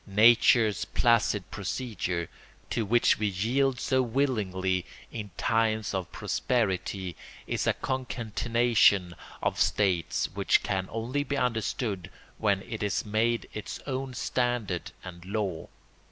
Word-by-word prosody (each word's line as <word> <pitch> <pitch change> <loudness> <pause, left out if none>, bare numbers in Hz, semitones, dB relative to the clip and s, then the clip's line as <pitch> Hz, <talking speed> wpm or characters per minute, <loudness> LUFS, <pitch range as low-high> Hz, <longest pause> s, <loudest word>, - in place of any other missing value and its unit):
Nature's 110 0 +5
placid 115 -5 +2
procedure, 95 -5 -3 0.4
to 115 - 0
which 120 +2 +3
we 105 - +1
yield 120 +7 +1
so 130 -1 +2
willingly 105 -8 0 0.3
in 105 -3 -6
times 110 -2 +1
of 95 -2 -3
prosperity, 95 -6 -1 0.3
is - - -1
a - - +4
concatenation 115 -6 +1 0.3
of - - 0
states 95 -5 +1
which - - +2
can 95 -2 -1
only 120 +6 -2
be 145 -1 -2
understood 110 -5 -1 0.3
when 100 -3 +1
it 110 - -6
is 105 -1 -1
made 115 +3 +1
its 110 +1 -6
own 135 -1 -3
standard 120 -8 -1
and 85 -1 -9
law. 95 -3 -3
110 Hz, 120 wpm, -28 LUFS, 95-120 Hz, 0.4 s, Nature's